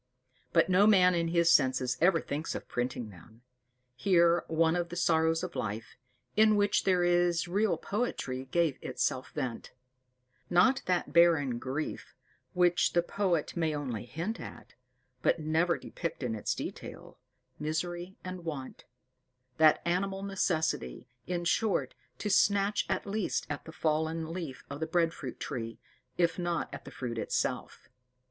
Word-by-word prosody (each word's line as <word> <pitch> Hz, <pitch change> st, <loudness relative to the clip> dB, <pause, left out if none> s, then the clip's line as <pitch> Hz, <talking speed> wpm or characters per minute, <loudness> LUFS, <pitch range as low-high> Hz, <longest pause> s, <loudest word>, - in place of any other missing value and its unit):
But 165 Hz, -1 st, +4 dB
no 190 Hz, +3 st, +5 dB
man 185 Hz, -4 st, +6 dB
in 170 Hz, -1 st, 0 dB
his 170 Hz, 0 st, +3 dB
senses 130 Hz, -3 st, +3 dB
ever 175 Hz, -1 st, +5 dB
thinks 150 Hz, +2 st, -4 dB
of -, -, -6 dB
printing 120 Hz, -2 st, -3 dB
them. 110 Hz, +6 st, -17 dB, 0.5 s
Here 170 Hz, +2 st, +3 dB
one 165 Hz, +1 st, +2 dB
of 175 Hz, -1 st, -1 dB
the 175 Hz, -, -6 dB
sorrows 165 Hz, -1 st, +2 dB
of 180 Hz, -1 st, -5 dB
life, 110 Hz, +1 st, -4 dB, 0.4 s
in 215 Hz, 0 st, +5 dB
which 205 Hz, 0 st, +2 dB
there 180 Hz, -2 st, +3 dB
is 175 Hz, -1 st, +2 dB
real 205 Hz, +5 st, +1 dB
poetry, 135 Hz, -, -3 dB
gave 160 Hz, 0 st, 0 dB
itself 130 Hz, 0 st, -2 dB
vent; 130 Hz, -6 st, -4 dB, 0.8 s
not 245 Hz, +10 st, +4 dB
that 180 Hz, -1 st, 0 dB
barren 160 Hz, -8 st, +4 dB
grief 135 Hz, +5 st, -5 dB, 0.4 s
which 175 Hz, -1 st, +3 dB
the 175 Hz, -, +3 dB
poet 175 Hz, -4 st, -1 dB
may 160 Hz, -3 st, 0 dB
only 125 Hz, -7 st, -4 dB
hint 170 Hz, -, -4 dB
at, -, -, -10 dB, 0.5 s
but -, -, +3 dB
never 160 Hz, +2 st, +1 dB
depict 165 Hz, -5 st, -5 dB
in 120 Hz, -2 st, -1 dB
its 105 Hz, -, -2 dB
detail -, -, -8 dB, 0.4 s
misery 175 Hz, +4 st, -3 dB
and 185 Hz, -1 st, -6 dB
want: 145 Hz, -6 st, -6 dB, 0.7 s
that 155 Hz, -1 st, +5 dB
animal 195 Hz, +3 st, -1 dB
necessity, 160 Hz, -, -1 dB, 0.2 s
in 175 Hz, -1 st, -2 dB
short, 215 Hz, +3 st, +1 dB, 0.2 s
to -, -, -4 dB
snatch 200 Hz, 0 st, +3 dB
at -, -, -1 dB
least 205 Hz, -1 st, -1 dB
at 145 Hz, -, -5 dB
a -, -, -7 dB
fallen 160 Hz, +1 st, -1 dB
leaf 165 Hz, -8 st, -6 dB
of 140 Hz, 0 st, -7 dB
the 160 Hz, -, -2 dB
bread 165 Hz, 0 st, +1 dB
fruit 130 Hz, -4 st, -7 dB
tree, 115 Hz, -4 st, -5 dB, 0.4 s
if 170 Hz, 0 st, +1 dB
not 175 Hz, -2 st, -2 dB
at -, -, -8 dB
the -, -, -9 dB
fruit 120 Hz, -3 st, -4 dB
itself. -, -, -2 dB
170 Hz, 150 wpm, -30 LUFS, 145-180 Hz, 0.8 s, man